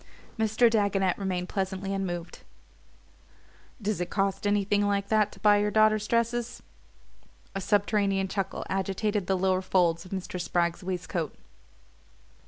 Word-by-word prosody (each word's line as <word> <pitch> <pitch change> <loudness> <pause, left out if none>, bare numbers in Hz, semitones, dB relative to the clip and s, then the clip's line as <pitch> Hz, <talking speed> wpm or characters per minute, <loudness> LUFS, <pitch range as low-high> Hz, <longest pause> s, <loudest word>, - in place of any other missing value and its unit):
Mr. 220 +2 +4
Dagonet 200 -4 +2
remained 185 -2 -2
pleasantly 195 0 -3
unmoved. 175 -3 -4 1.4
"Does 210 -3 -2
it 175 - -2
cost 195 0 0
anything 205 0 +2
like 200 0 0
that 215 -1 +3
to - - -15
buy 205 +1 +5
your 205 0 +1
daughter's 215 0 +3
dresses?" 235 0 -1 0.9
A 195 - -3
subterranean 200 0 +1
chuckle 195 0 -3
agitated 195 +1 -1
the 190 - +2
lower 185 0 +1
folds 175 -3 +2
of 185 - -13
Mr. 185 -1 -4
Spragg's 170 +1 0
waistcoat. 180 -3 -3
195 Hz, 130 wpm, -28 LUFS, 185-210 Hz, 1.4 s, buy